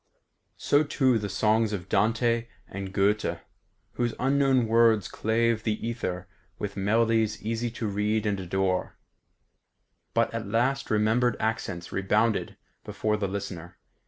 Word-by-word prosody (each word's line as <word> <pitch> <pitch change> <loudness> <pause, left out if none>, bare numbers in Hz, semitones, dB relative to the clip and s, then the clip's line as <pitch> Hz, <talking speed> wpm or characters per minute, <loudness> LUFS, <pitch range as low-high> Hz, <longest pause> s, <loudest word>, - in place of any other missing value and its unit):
So 145 +1 +3
too 130 -5 +2
the 105 -1 -4
songs 110 +2 +2
of 90 -3 -4
Dante 115 +4 +1 0.2
and 95 0 -6
Goethe, 100 +2 +1 0.6
whose 120 -1 -1
unknown 135 -2 +3
words 115 -2 +4
clave 115 0 0
the 110 -1 -1
ether 95 -6 -4 0.3
with 105 -1 -5
melodies 110 +2 +1
easy 115 +2 -2
to 115 0 -5
read 105 +1 0
and 105 -1 +1
to 95 - -6
adore. 95 0 -1 1.2
But - - +2
at - - -4
last 125 +6 0
remembered 110 +3 +2
accents 100 -6 -3
rebounded 105 +3 0 0.3
before 105 0 -1
the 105 -2 -1
listener. 95 -3 -6
110 Hz, 130 wpm, -27 LUFS, 100-115 Hz, 1.2 s, words